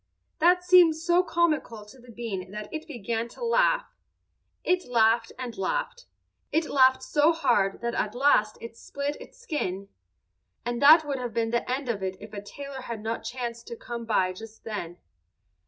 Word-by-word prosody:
That 360 +2 +4
seemed 355 -3 +6
so 345 +2 +2
comical 310 -11 -1
to 215 +5 -16
the 245 0 -17
bean 215 -6 -5
that 210 +1 -8
it 315 0 -5
began 230 -3 -3
to 475 - -7
laugh. - - +3 0.8
It 365 -3 0
laughed 230 -1 +3
and 250 -3 -6
laughed; - - -3 0.4
it 320 +1 +1
laughed 260 -1 +4
so 300 +4 +3
hard 240 -13 +1
that 235 0 -2
at 215 0 -2
last 245 -5 +3
it 230 0 -9
split 280 +4 -4
its - - -13
skin, 200 - -4 0.8
and 240 0 -2
that 310 +3 +8
would 280 -2 -3
have 245 -2 -5
been 225 -1 0
the 235 +1 -1
end 265 +1 -2
of 220 -5 -2
it 190 0 -3
if 215 - -12
a 200 - -5
tailor 275 +5 -8
had 230 -4 -6
not 225 +1 -3
chanced 240 -2 -5
to 235 - -6
come 235 0 -7
by 185 -5 +1
just 220 +3 -12
then. 175 -6 -5
240 Hz, 180 wpm, -27 LUFS, 220-305 Hz, 0.8 s, that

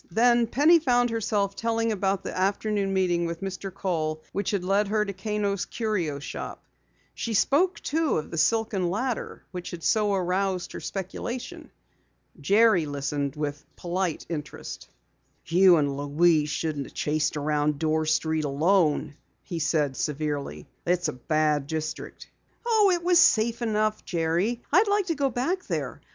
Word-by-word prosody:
Then 235 +4 +3
Penny 305 +8 +5
found 245 -5 +2
herself 205 -3 -1
telling 230 0 0
about 195 -1 0
the - - -5
afternoon 200 +1 0
meeting 175 -3 +1
with 165 0 -5
Mr. 195 0 -5
Kohl 155 -5 -2
which 200 -1 -2
had 200 -3 -1
led 200 +3 +2
her 210 +1 +1
to 200 - -4
Kano's 200 0 -2
Curio 190 -11 -2
Shop. 140 - -7 0.5
She 230 -2 -3
spoke, 335 - +2
too, 320 0 0
of 155 - -5
the 165 - -5
silken 195 +1 +1
ladder 235 +6 -3
which 180 -1 -6
had 170 -2 -8
so 210 -2 +2
aroused 185 0 -1
her - - -6
speculation. 200 +6 -6 0.7
Jerry 200 +1 +4
listened 140 0 -3
with 150 -1 -4
polite 175 -1 -2
interest. 150 -3 -7 0.6
"You 180 +1 +6
and 145 -2 0
Louise 150 +2 +2
shouldn't 150 -3 -2
have - - -17
chased 150 0 0
around 150 0 0
Dorr 155 0 0
Street 155 0 +1
alone," 155 0 +2 0.3
he 170 - -5
said 150 -3 +1
severely. 145 - -3 0.2
"It's 180 +1 +1
a - - -4
bad 150 +2 0
district." 155 0 -5 0.4
"Oh, 440 -4 +4
it 350 -1 0
was 355 -1 +5
safe 235 -7 +4
enough, 215 -1 0
Jerry. 175 +8 -1
I'd 390 +6 +5
like 405 -1 +2
to 340 - 0
go 280 -2 +1
back 320 +10 -2
there. - - -3
185 Hz, 155 wpm, -26 LUFS, 155-225 Hz, 0.7 s, You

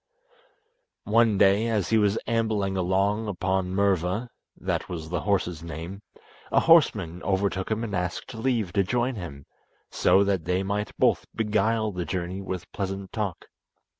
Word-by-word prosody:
One 110 -1 +3
day, 100 +3 +4
as 110 -5 0
he 110 - +5
was 105 0 +2
ambling 110 -4 0
along 100 +4 +1
upon 95 -1 -1
Murva 95 +3 +1 0.3
(that - - -2
was 80 -3 -5
the 90 - -1
horse's 90 -5 0
name), 85 +4 -7 0.5
a - - +4
horseman 105 - +4
overtook 95 0 -1
him 110 +1 -1
and 105 -4 -3
asked 90 +7 -3
leave 110 -5 -1
to 100 - +3
join 120 +6 0
him, 80 - -8 0.5
so 95 - +4
that 95 -5 0
they 90 +2 0
might 100 +2 -3
both - - +2
beguile 110 0 +1
the 90 -2 -4
journey 90 +2 -3
with 95 -2 -6
pleasant 95 -1 -4
talk. 105 -6 -3
100 Hz, 150 wpm, -26 LUFS, 90-110 Hz, 0.5 s, he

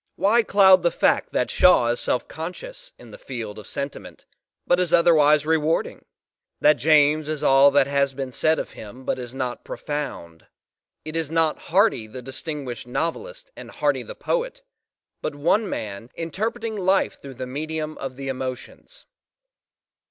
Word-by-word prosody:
Why 225 +4 +3
cloud 190 -3 +5
the 170 - +3
fact - - +1
that - - 0
Shaw 120 - +5
is 120 - 0
selfconscious 340 - -4
in - - -14
the - - -12
field 110 -5 -7
of 105 - -12
sentiment 140 0 -7 0.4
but 175 - +3
is 180 -2 0
otherwise 150 -3 +5
re 160 +1 +3
warding? 155 +1 -2 0.5
that 150 0 +5
James 150 +2 +3
is 155 -2 -3
all 135 +1 +6
that 140 -1 +4
has 140 0 0
been 135 -1 -4
said 155 +5 +2
of - - -4
him 120 +5 -11
but - - -1
is 125 0 -8
not 125 -2 -4
profound? 140 - -6 0.6
It 155 +1 -6
is 165 -3 -1
not 160 -1 +1
Hardy 185 - +2
the 125 +3 -9
distinguished 135 -2 -6
novelist 465 - -4
and - - -10
Hardy - - 0
the - - -9
poet, - - -3 0.6
but - - -4
one 180 +9 +1
man 105 +2 -5
"interpreting 220 +7 -3
life 190 0 +1
through 135 -2 -10
the 130 - -5
medium 155 +3 -4
of 135 -1 -5
the 135 +1 -7
emotions." 130 - -6
150 Hz, 160 wpm, -23 LUFS, 130-175 Hz, 0.6 s, all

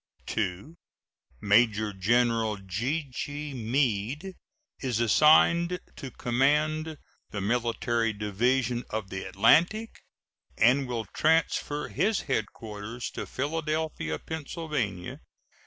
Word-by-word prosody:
2. 100 - -3 0.7
Major 105 0 +3
General 115 +2 +2
G.G. 140 - -4
Meade 125 - -1 0.5
is 125 -4 -1
assigned 165 - +5 0.2
to 135 - -7
command 150 +6 +1 0.3
the 105 - -5
Military 115 +1 0
Division 120 +4 0
of 105 -3 -4
the 95 - -4
Atlantic, 175 - +2 0.6
and 130 +4 +4
will 115 -3 -3
transfer 155 -2 +1
his 200 +7 +1
headquarters 110 -2 -4
to - - -6
Philadelphia, 155 - -2
Pa. 160 - -6
125 Hz, 90 wpm, -28 LUFS, 110-150 Hz, 0.7 s, assigned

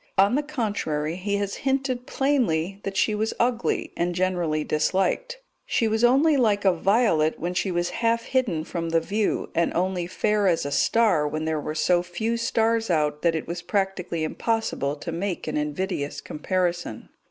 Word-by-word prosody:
On 195 +4 +5
the 285 - +2
contrary, 205 - -2
he 200 +3 -2
has 200 -1 -2
hinted 265 -2 -1
plainly 200 - 0
that 195 -1 -4
she 210 +3 +2
was 220 +1 -1
ugly, 240 0 0
and 175 0 -1
generally 175 -4 0
disliked; 190 - 0 0.3
she 230 - +1
was 220 +1 0
only 280 +5 +5
like 210 -5 +2
a 190 - +5
violet 175 -4 +2
when 175 +2 -2
she 185 +2 0
was 175 0 -1
half 230 0 +1
hidden 230 -13 0
from 165 0 -4
the 165 0 +3
view, 205 +5 -1
and 170 0 +1
only 180 0 0
fair 210 +2 +1
as 170 -5 +2
a 145 - -3
star 210 -6 +3
when 155 +1 -3
there 160 -1 -1
were 155 - -4
so 175 +2 +3
few 180 +6 -2
stars 230 -1 +1
out 150 -3 +1
that 170 -1 +2
it 160 - -3
was 175 +1 -4
practically 185 -3 -1
impossible 155 -6 -1
to 160 +3 -6
make 175 +1 -3
an 155 - -2
invidious 150 0 -2
comparison. 175 -5 -2
185 Hz, 175 wpm, -25 LUFS, 165-225 Hz, 0.3 s, On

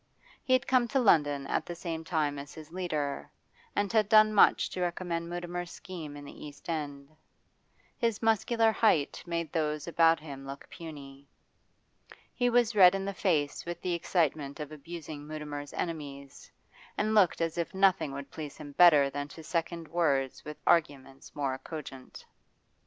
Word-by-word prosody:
He 255 - +1
had 255 +1 +3
come 255 -2 +3
to 250 +4 +1
London 145 - +3
at - - -1
the 175 - -5
same 165 -2 -5
time 155 -4 -1
as 140 +1 -10
his 155 0 -11
leader, 155 -6 -3 0.5
and 205 0 0
had 215 -2 +3
done 215 0 +6
much 205 - +5
to 185 - -4
recommend 175 -1 -2
Mutimer's 175 0 -4
scheme 170 -7 -8
in 145 - -10
the - - -11
East 145 +1 -11
End. 145 -2 -5 0.8
His 230 -4 0
muscular 225 0 +3
height 190 -11 +2
made 170 -2 -2
those 150 -2 -1
about 165 -1 +4
him 140 -3 -9
look 140 +1 -8
puny. 140 -4 -10 1.1
He 245 -1 +1
was 240 -1 +3
red 185 -2 +8
in 195 0 -2
the 200 - -3
face 155 -7 0
with 175 0 -5
the 180 - -1
excitement 160 -4 0
of 150 0 -6
abusing 155 -1 -8
Mutimer's 150 -2 -6
enemies, 140 -4 -6 0.5
and 215 +1 +1
looked 205 -5 +4
as 165 -1 -1
if 170 0 -2
nothing 190 -6 +3
would 140 0 -7
please 150 -3 -7
him 145 - -9
better 150 -3 +7
than 145 0 -4
to 160 +2 -12
second 165 0 -3
words 140 -6 0
with 150 0 -8
arguments 135 -5 0
more 135 -2 -2
cogent. 135 -3 -9
160 Hz, 165 wpm, -30 LUFS, 145-180 Hz, 1.1 s, red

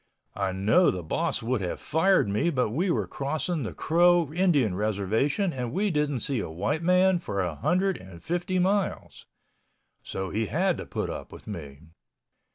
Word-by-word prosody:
I 100 -2 -1
know 105 - +3
the 90 -2 -3
boss 80 - -1
would 120 -1 0
have 90 - -3
fired 175 - +2
me 105 +12 +1
but 125 -8 0
we 175 - 0
were - - +1
crossing 155 +4 -2
the 115 - -3
Crow 170 -2 +3
Indian 160 - +2
Reservation 110 - 0
and 125 -3 -3
we 200 - 0
didn't 150 -5 0
see 135 -4 -1
a 100 - -4
white 105 - -2
man 180 +1 +4
for 100 - -4
a 90 -3 -1
hundred 185 - +1
and 90 -3 -13
fifty 175 +2 -1
miles, 190 +2 -1 0.7
so 95 -1 -5
he 110 0 -1
had 180 +2 +1
to - - -7
put - - -3
up - - -7
with - - -12
me. 70 0 -8
145 Hz, 175 wpm, -27 LUFS, -, 0.7 s, man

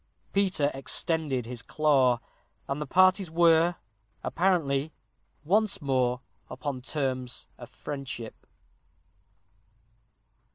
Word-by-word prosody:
Peter 190 -7 +2
extended 135 -1 -2
his 120 0 -7
claw, 135 -6 +3 0.5
and 140 +2 -3
the 150 - -3
parties 185 +3 +4
were, 165 +1 +4 0.5
apparently, 160 -5 +1 0.5
once 210 +6 +2
more 130 -3 +1 0.3
upon 130 0 -4
terms 130 -2 -3
of 120 -1 -10
friendship. 135 -5 -7
145 Hz, 85 wpm, -28 LUFS, 130-170 Hz, 0.5 s, parties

